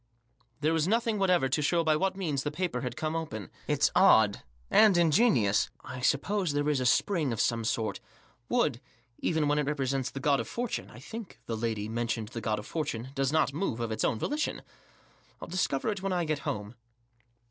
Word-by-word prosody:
There 155 Hz, +2 st, +2 dB
was 160 Hz, 0 st, +1 dB
nothing 225 Hz, 0 st, +1 dB
whatever 180 Hz, -7 st, +3 dB
to 130 Hz, +4 st, 0 dB
show 165 Hz, +3 st, +2 dB
by 155 Hz, -1 st, +3 dB
what 190 Hz, +4 st, 0 dB
means 155 Hz, -8 st, -1 dB
the 145 Hz, -, -2 dB
paper 155 Hz, -5 st, -2 dB
had 125 Hz, -2 st, -4 dB
come 155 Hz, 0 st, -2 dB
open. 110 Hz, -, -5 dB
" -, -, -26 dB
It's -, -, +2 dB
odd, 105 Hz, -2 st, +5 dB, 0.3 s
and 215 Hz, -5 st, +6 dB
ingenious. 160 Hz, -, +3 dB
I 130 Hz, -, -7 dB
suppose 170 Hz, +6 st, +1 dB
there 145 Hz, 0 st, 0 dB
is 145 Hz, -3 st, +1 dB
a 125 Hz, -, +1 dB
spring 155 Hz, 0 st, +2 dB
of 115 Hz, -, -3 dB
some 115 Hz, -1 st, +1 dB
sort; 110 Hz, 0 st, -1 dB, 0.5 s
wood, -, -, +1 dB, 0.4 s
even 160 Hz, -3 st, +1 dB
when 145 Hz, +1 st, +2 dB
it 145 Hz, -, -1 dB
represents 135 Hz, -3 st, -1 dB
the 135 Hz, -, -7 dB
God 140 Hz, 0 st, +2 dB
of 115 Hz, -, -3 dB
Fortune— 240 Hz, -, -3 dB
I -, -, -13 dB
think 210 Hz, -, -8 dB
the 115 Hz, -, -3 dB
lady 110 Hz, -2 st, -2 dB
mentioned 115 Hz, -1 st, -2 dB
the 115 Hz, -1 st, -6 dB
God 110 Hz, -1 st, 0 dB
of 105 Hz, -, -7 dB
Fortune— 130 Hz, -7 st, -3 dB
does 135 Hz, -1 st, 0 dB
not 155 Hz, -3 st, +2 dB
move 150 Hz, -, -2 dB
of 115 Hz, -1 st, -2 dB
its 110 Hz, -, -2 dB
own -, -, +1 dB
volition, 300 Hz, -, -2 dB, 0.7 s
Til -, -, -9 dB
discover 175 Hz, -1 st, 0 dB
it 205 Hz, -3 st, -3 dB
when 195 Hz, -1 st, -1 dB
I 175 Hz, -2 st, 0 dB
get 155 Hz, -2 st, -1 dB
home." 105 Hz, -8 st, -4 dB
145 Hz, 205 wpm, -29 LUFS, 120-175 Hz, 0.7 s, and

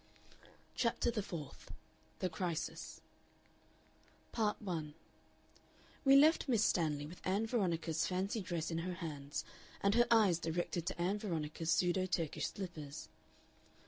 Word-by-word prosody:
CHAPTER 235 Hz, 0 st, +1 dB
THE 220 Hz, -2 st, -1 dB
FOURTH 145 Hz, -, -7 dB, 0.5 s
THE 185 Hz, -, +1 dB
CRISIS 170 Hz, -2 st, -3 dB, 1.3 s
Part 215 Hz, -2 st, 0 dB
1 160 Hz, -7 st, -4 dB, 1.1 s
We 275 Hz, -1 st, +7 dB
left 305 Hz, +4 st, +6 dB
Miss 225 Hz, -4 st, +4 dB
Stanley 150 Hz, -4 st, +1 dB
with 170 Hz, +4 st, -10 dB
Ann 200 Hz, +4 st, +1 dB
Veronica's 170 Hz, -8 st, 0 dB
fancy 190 Hz, +4 st, -1 dB
dress 170 Hz, -3 st, -2 dB
in 165 Hz, -, -1 dB
her 180 Hz, +1 st, -3 dB
hands 145 Hz, -5 st, -5 dB, 0.3 s
and 200 Hz, 0 st, +3 dB
her 240 Hz, +1 st, +5 dB
eyes 210 Hz, -7 st, +5 dB
directed 170 Hz, +1 st, -2 dB
to -, -, -3 dB
Ann 190 Hz, +4 st, +1 dB
Veronica's 165 Hz, -5 st, -3 dB
pseudo 180 Hz, +2 st, +3 dB
Turkish 165 Hz, -4 st, -1 dB
slippers. 160 Hz, -7 st, -7 dB
175 Hz, 125 wpm, -36 LUFS, 160-205 Hz, 1.3 s, We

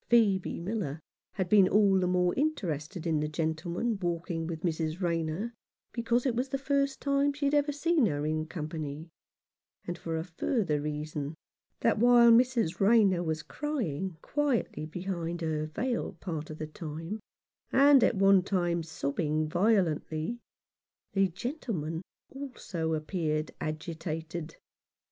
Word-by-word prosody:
Phcebe 210 Hz, -6 st, +3 dB
Miller 170 Hz, -5 st, -3 dB, 0.3 s
had 190 Hz, -3 st, -1 dB
been 195 Hz, 0 st, +6 dB
all 200 Hz, -1 st, +5 dB
the 180 Hz, -, +1 dB
more 180 Hz, 0 st, +2 dB
interested 180 Hz, -, -2 dB
in 160 Hz, -2 st, +1 dB
the 150 Hz, -, 0 dB
gentleman 165 Hz, +8 st, -1 dB
walking 170 Hz, -1 st, -2 dB
with 165 Hz, -2 st, -5 dB
Mrs. 160 Hz, -1 st, -1 dB
Rayner, 170 Hz, +5 st, -1 dB, 0.4 s
because 235 Hz, +1 st, 0 dB
it 260 Hz, -, +2 dB
was 255 Hz, +3 st, -1 dB
the 275 Hz, -, -1 dB
first 275 Hz, 0 st, 0 dB
time 280 Hz, 0 st, +2 dB
she 285 Hz, 0 st, -3 dB
had 280 Hz, -, +2 dB
ever 290 Hz, 0 st, +3 dB
seen 295 Hz, -2 st, +2 dB
her 145 Hz, -3 st, -1 dB
in 155 Hz, +1 st, -1 dB
company; 155 Hz, -1 st, -5 dB, 0.7 s
and 175 Hz, 0 st, -4 dB
for 165 Hz, -1 st, -3 dB
a 160 Hz, -, -2 dB
further 170 Hz, -, -1 dB
reason 150 Hz, 0 st, -4 dB, 0.5 s
that -, -, +3 dB
while 240 Hz, 0 st, +7 dB
Mrs. 235 Hz, -7 st, +3 dB
Rayner 200 Hz, -3 st, +5 dB
was 160 Hz, -2 st, -2 dB
crying 190 Hz, -, -3 dB
quietly 275 Hz, -, 0 dB
behind 175 Hz, 0 st, -4 dB
her 155 Hz, -1 st, -1 dB
veil 235 Hz, +10 st, -2 dB
part 160 Hz, -5 st, -4 dB
of 155 Hz, -, -7 dB
the 155 Hz, -, -4 dB
time, 165 Hz, +5 st, -6 dB, 0.5 s
and 275 Hz, -1 st, +7 dB
at -, -, +3 dB
one 195 Hz, -1 st, +6 dB
time 175 Hz, -2 st, 0 dB
sobbing 155 Hz, 0 st, -1 dB
violently, 175 Hz, +1 st, +1 dB, 0.7 s
the 195 Hz, -1 st, +4 dB
gentleman 185 Hz, -, -4 dB, 0.3 s
also 220 Hz, -12 st, -4 dB
appeared 155 Hz, -1 st, -2 dB
agitated. 160 Hz, +1 st, -4 dB
175 Hz, 140 wpm, -30 LUFS, 155-230 Hz, 0.7 s, while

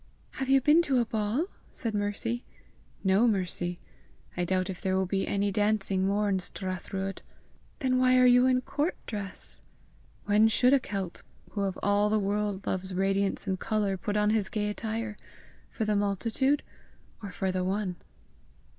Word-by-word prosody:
"Have 265 Hz, 0 st, -4 dB
you 270 Hz, 0 st, +5 dB
been 305 Hz, +5 st, +5 dB
to 270 Hz, -6 st, +2 dB
a 240 Hz, -, +2 dB
ball?" 220 Hz, +7 st, 0 dB, 0.3 s
said 230 Hz, -3 st, -2 dB
Mercy. 210 Hz, +4 st, -1 dB, 0.6 s
"No, 195 Hz, +5 st, +4 dB
Mercy. 180 Hz, -4 st, -1 dB, 0.6 s
I 175 Hz, -, 0 dB
doubt 185 Hz, 0 st, 0 dB
if 185 Hz, -2 st, -6 dB
there 190 Hz, -2 st, +1 dB
will 190 Hz, -, +1 dB
be 195 Hz, +1 st, -1 dB
any 200 Hz, 0 st, 0 dB
dancing 200 Hz, -2 st, +1 dB
more 205 Hz, +1 st, +1 dB
in 195 Hz, -2 st, +1 dB
Strathruadh!" 190 Hz, +1 st, -4 dB, 0.6 s
"Then 255 Hz, -2 st, +2 dB
why 255 Hz, 0 st, +5 dB
are 255 Hz, -, +6 dB
you 250 Hz, +1 st, +6 dB
in 255 Hz, -1 st, +3 dB
court 295 Hz, +6 st, -1 dB
dress?" 205 Hz, -3 st, -5 dB, 0.6 s
"When 210 Hz, +2 st, +5 dB
should 245 Hz, +4 st, +4 dB
a 280 Hz, -, +6 dB
Celt, 195 Hz, -7 st, -5 dB, 0.3 s
who 205 Hz, -, -3 dB
of 195 Hz, -2 st, -1 dB
all 205 Hz, +1 st, +3 dB
the 215 Hz, -, +2 dB
world 205 Hz, -1 st, -1 dB
loves 190 Hz, 0 st, -2 dB
radiance 195 Hz, +1 st, 0 dB
and 190 Hz, -2 st, -1 dB
colour, 210 Hz, -3 st, 0 dB
put 205 Hz, +3 st, -2 dB
on 210 Hz, 0 st, +3 dB
his 215 Hz, -3 st, +1 dB
gay 210 Hz, -1 st, -1 dB
attire? 220 Hz, 0 st, -4 dB, 0.5 s
For 220 Hz, -, -3 dB
the 210 Hz, 0 st, +1 dB
multitude, 225 Hz, +8 st, +1 dB, 0.6 s
or 200 Hz, -2 st, -6 dB
for 190 Hz, -2 st, -1 dB
the 185 Hz, 0 st, -1 dB
one?" 190 Hz, -1 st, -1 dB
205 Hz, 170 wpm, -29 LUFS, 195-230 Hz, 0.6 s, are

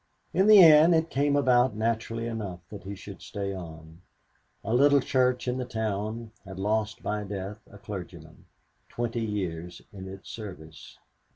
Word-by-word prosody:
In 190 Hz, +4 st, +3 dB
the 210 Hz, -3 st, +10 dB
end 160 Hz, +1 st, +8 dB
it 160 Hz, 0 st, 0 dB
came 145 Hz, +1 st, +1 dB
about 125 Hz, -3 st, +3 dB
naturally 115 Hz, +1 st, -2 dB
enough 105 Hz, -6 st, -5 dB
that 105 Hz, -, -9 dB
he 100 Hz, +1 st, -6 dB
should 100 Hz, 0 st, -11 dB
stay 100 Hz, -2 st, -4 dB
on. 80 Hz, -2 st, -10 dB, 0.6 s
A 110 Hz, -, -2 dB
little 140 Hz, +3 st, +5 dB
church 125 Hz, -1 st, +1 dB
in 125 Hz, +1 st, -1 dB
the -, -, -1 dB
town 110 Hz, -1 st, -3 dB
had 95 Hz, -1 st, -10 dB
lost 105 Hz, +2 st, -1 dB
by 105 Hz, 0 st, -2 dB
death 100 Hz, 0 st, -6 dB
a 100 Hz, -, -13 dB
clergyman, 90 Hz, -6 st, -9 dB, 0.4 s
twenty 120 Hz, 0 st, -3 dB
years 90 Hz, -5 st, -4 dB
in 95 Hz, -1 st, -8 dB
its 95 Hz, +1 st, -10 dB
service. 90 Hz, -8 st, -10 dB
105 Hz, 160 wpm, -27 LUFS, 95-125 Hz, 0.6 s, the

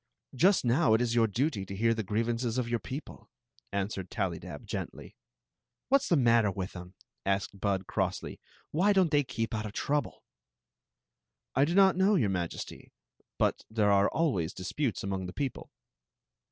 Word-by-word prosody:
Just 180 Hz, +5 st, +4 dB
now 120 Hz, -1 st, +4 dB
it 110 Hz, -, +1 dB
is 120 Hz, -1 st, +1 dB
your 115 Hz, -1 st, +4 dB
duty 115 Hz, 0 st, -1 dB
to 95 Hz, 0 st, -7 dB
hear 115 Hz, +3 st, +2 dB
the 115 Hz, -, -2 dB
grievances 115 Hz, +3 st, -1 dB
of 125 Hz, -2 st, 0 dB
your 120 Hz, 0 st, 0 dB
people," 135 Hz, +6 st, -8 dB, 0.4 s
answered 100 Hz, -2 st, -3 dB
Tallydab, 95 Hz, -7 st, -4 dB
gently. -, -, -6 dB, 0.4 s
" 120 Hz, -, -60 dB
What 275 Hz, +1 st, +5 dB
's -, -, -4 dB
the 175 Hz, -, +5 dB
matter 115 Hz, -6 st, +4 dB
with 95 Hz, -1 st, -5 dB
'em? 90 Hz, +1 st, -9 dB, 0.2 s
" -, -, -62 dB
asked 100 Hz, 0 st, -1 dB
Bud, 95 Hz, -1 st, 0 dB
crossly. -, -, -2 dB, 0.3 s
"Why 190 Hz, +7 st, +3 dB
don't 185 Hz, -5 st, +3 dB
they 145 Hz, -1 st, +4 dB
keep 115 Hz, -3 st, -3 dB
out 110 Hz, -1 st, -2 dB
of 105 Hz, -, -9 dB
trouble?" 145 Hz, +2 st, -2 dB, 1.3 s
"I 135 Hz, +2 st, +4 dB
do 170 Hz, +4 st, -1 dB
not 195 Hz, -2 st, +6 dB
know, 195 Hz, +2 st, +4 dB
your 110 Hz, -, +2 dB
Majesty; 90 Hz, -3 st, -5 dB, 0.5 s
but. -, -, +1 dB
there 105 Hz, -2 st, +2 dB
are 100 Hz, 0 st, +4 dB
always 110 Hz, -, 0 dB
disputes 110 Hz, +7 st, -2 dB
among 95 Hz, -1 st, -3 dB
the 90 Hz, -, -7 dB
people." 140 Hz, -4 st, -4 dB
115 Hz, 175 wpm, -30 LUFS, 100-145 Hz, 1.3 s, not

